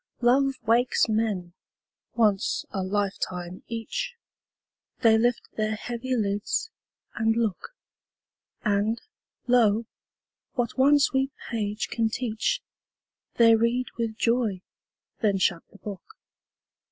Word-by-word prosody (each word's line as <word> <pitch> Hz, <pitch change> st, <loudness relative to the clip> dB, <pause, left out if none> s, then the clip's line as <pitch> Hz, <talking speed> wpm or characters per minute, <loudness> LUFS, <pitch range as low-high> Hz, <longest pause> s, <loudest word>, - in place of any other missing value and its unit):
Love 270 Hz, +3 st, +4 dB
wakes 235 Hz, +3 st, +3 dB
men, 215 Hz, -6 st, -1 dB, 0.6 s
once 210 Hz, -4 st, +2 dB
a 195 Hz, -, -2 dB
lifetime 185 Hz, -2 st, -2 dB
each; 485 Hz, -, -4 dB, 0.9 s
They 225 Hz, -3 st, +6 dB
lift 240 Hz, +2 st, +1 dB
their 215 Hz, 0 st, 0 dB
heavy 245 Hz, +3 st, -3 dB
lids, 205 Hz, -, -1 dB, 0.4 s
and 225 Hz, -1 st, +1 dB
look; 230 Hz, -, -2 dB, 0.9 s
And, 210 Hz, +2 st, +1 dB, 0.5 s
lo, 230 Hz, -3 st, +4 dB, 0.7 s
what 245 Hz, -2 st, -1 dB
one 280 Hz, +2 st, +6 dB
sweet 270 Hz, -1 st, +2 dB, 0.2 s
page 210 Hz, -2 st, -2 dB
can 225 Hz, -1 st, +1 dB
teach, 240 Hz, -, -1 dB, 0.7 s
They 230 Hz, -1 st, +7 dB
read 235 Hz, +3 st, +1 dB
with 225 Hz, -2 st, -3 dB
joy, 230 Hz, -6 st, +1 dB, 0.6 s
then 205 Hz, -3 st, +2 dB
shut 175 Hz, -2 st, +1 dB
the -, -, -17 dB
book. 200 Hz, -2 st, -7 dB
225 Hz, 105 wpm, -26 LUFS, 205-245 Hz, 0.9 s, They